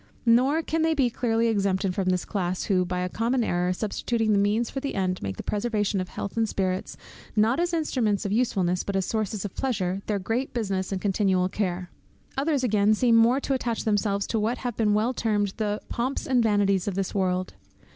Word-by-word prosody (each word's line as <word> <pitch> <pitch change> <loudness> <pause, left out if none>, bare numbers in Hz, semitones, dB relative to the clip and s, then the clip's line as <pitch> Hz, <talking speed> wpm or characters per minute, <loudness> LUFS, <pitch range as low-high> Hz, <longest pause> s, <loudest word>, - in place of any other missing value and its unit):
Nor 260 +7 +4
can 325 +1 -1
they 320 0 +2
be 260 -5 +2
clearly 230 -1 +1
exempted 195 -3 +1
from 185 0 0
this 180 -1 0
class, 185 -2 -2
who, 185 -3 +2
by 180 0 -2
a 180 - -1
common 235 +6 0
error, 180 -2 0
substituting 215 +3 -1
the 200 - +3
means 210 +4 +1
for 270 - -3
the 275 +1 -4
end, 185 -2 -1
make 95 -1 -4
the - - -6
preservation 210 -2 0
of 185 - -6
health 200 - -5
and 225 -1 +1
spirits, 185 -1 -2 0.4
not 225 +6 +3
as 345 0 +1
instruments 250 - 0
of 200 - -1
usefulness, 195 -6 +1
but 200 - -3
as 190 -1 +1
sources 215 -1 -2
of 200 - -5
pleasure, 195 -7 -1
their 210 - 0
great 230 +8 -2
business 195 -5 -1
and 190 -1 -2
continual 190 -2 +2
care. 185 -3 -3 0.4
Others 280 -1 0
again 215 -2 +3
seem 235 +1 +3
more 235 +4 +5
to 275 - -1
attach 240 -4 -1
themselves 205 -2 +1
to 225 - -1
what 225 +4 0
have 245 -3 -4
been 210 -2 +2
well 225 +4 +1
termed 205 -4 0
the 210 -1 -1
'pomps 255 +4 -2
and 255 -2 +3
vanities 205 -4 +2
of 200 - -1
this 195 -1 -2
world.' 185 -2 0
210 Hz, 210 wpm, -26 LUFS, 190-235 Hz, 0.4 s, more